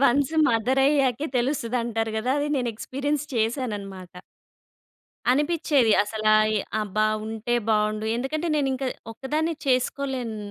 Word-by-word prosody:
Once 275 +4 +3 0.2
mother 240 +4 +2
అయ్యాకే 280 -1 +2
తెలుస్తది 245 -1 -1
అంటారు 225 -1 -1
కదా! 250 +4 -1
అది 290 +1 -1
నేను 245 -2 0
ఎక్స్పీరియన్స్ 285 +5 -2
చేసానన్నమాట. 205 -6 -3 1.1
అనిపిచేది 290 -4 +2
అసలా 215 0 0 0.2
ఎ - - +2 0.2
అబ్బా! 215 +1 0 0.2
ఉంటే 225 +2 -2 0.2
బాగుండు. 215 0 +1
ఎందుకంటే, 305 +7 -2
నేను 280 -2 +1
ఇంకా 265 0 -3 0.3
ఒక్కదాన్నే 305 +7 -2
చేసుకోలేను. 255 -2 -1
250 Hz, 120 wpm, -25 LUFS, 220-280 Hz, 1.1 s, Once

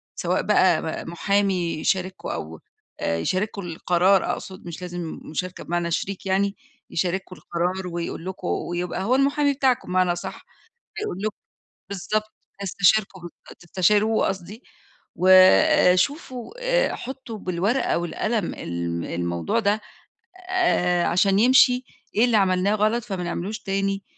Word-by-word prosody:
سواء - - 0
بقى - - +3 0.2
م 165 - -7
محامي 190 -1 +1
يشارككوا 185 +2 -1
أو 80 +1 -6 0.4
آآ 80 - 0
يشارككوا 195 - -2
القرار 175 +3 +2
أقصد 185 -1 -8
مش 170 +1 -7
لازم 175 -2 -5
مشاركة 180 +4 -5
بمعنى 170 0 -2
شريك 195 +3 -3
يعني 195 +1 +1 0.3
يشارككوا 185 +1 -2
القرار 180 +2 -2
ويقول 170 0 -5
لكم 185 -1 -6
ويبقى 175 +1 -2
هو 250 +5 +2
المحامي 280 +1 +2
بتاعكوا 260 -6 +1
بمعنى 185 -1 +2
أصح، 175 - -7 0.5
هيقول 300 - -4
لكم 215 -1 -2 0.6
بالضبط 215 +3 -2 0.3
هيستشيركوا 195 0 +2 0.4
تستشيروه 205 +5 +2
قصدي 195 +5 -6 0.5
وشوفوا 235 - +4
آآ - - +1
حُطّوا 255 -4 -7
بالورقة 195 +6 0
والقلم 210 +4 -2
الم 85 0 -4
الموضوع 85 - -2
ده 210 0 +1 0.7
آآ 180 - +2
عشان 195 +3 +3
يمشي 250 +1 +5 0.3
إيه 225 - +5
اللي 235 -3 +3
عملناه 190 +1 +2
غلط 215 +2 +1
فمنعملوش 185 +1 -4
تاني؟ 195 0 -2
190 Hz, 120 wpm, -24 LUFS, 175-215 Hz, 0.7 s, يمشي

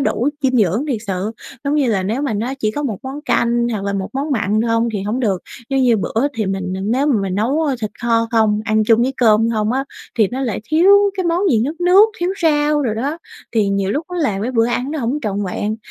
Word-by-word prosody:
đủ 275 -1 0
dinh 255 -1 +2
dưỡng 210 - +2
thiệt 245 -6 0
sự. 190 +2 -2 0.3
Giống 280 +1 0
như 285 -4 +2
là, 200 -5 +1
nếu 225 +9 -2
mà 280 - -1
nó 240 +6 -2
chỉ 215 -4 0
có 290 +7 -4
1 230 -9 -2
món 270 +2 -6
canh 235 -3 +1
hoặc 200 -2 -3
là 200 - -1
1 195 -1 -3
món 280 +3 -3
mặn 215 -4 +1
không 230 +1 +1
thì 200 -2 -3
hổng 215 +5 -2
được. 200 -7 0 0.3
Giống 270 0 +2
như, 240 -3 +4
bữa 225 +5 0
thì 215 -3 -2
mình 190 -1 -3
nếu 250 +8 +1
mà 250 -8 +2
mình 190 -2 -2
nấu, 260 +10 +1
ơ, 285 -4 0
thịt 215 - -3
kho 230 -1 +2
không, 215 -2 +2
ăn 215 -1 +2
chung 230 +1 +4
với 265 +2 0
cơm 225 -1 +3
không 220 0 0
á, 270 +1 -1 0.3
thì 210 -4 +4
nó 260 +2 -4
lại 230 -7 -2
thiếu 315 - +3 0.3
cái 370 - -1
món 340 +1 +1
gì 225 -5 +3
nước 320 +6 -5
nước, 375 +5 +6
thiếu 350 +2 0
rau 295 -1 +2
đồ 230 -5 -1
đó, 280 +9 -3 0.3
thì 215 -3 +2
nhiều 200 0 0
lúc 305 +7 -2
nó - - -3
là 240 -11 0
cái 245 - -1
bữa 230 -1 +3
ăn 245 +3 -2
nó 310 - -3
hổng 255 +4 -1
trọn 205 -1 -2
vẹn. 205 +3 -3
235 Hz, 260 wpm, -18 LUFS, 210-275 Hz, 0.3 s, nước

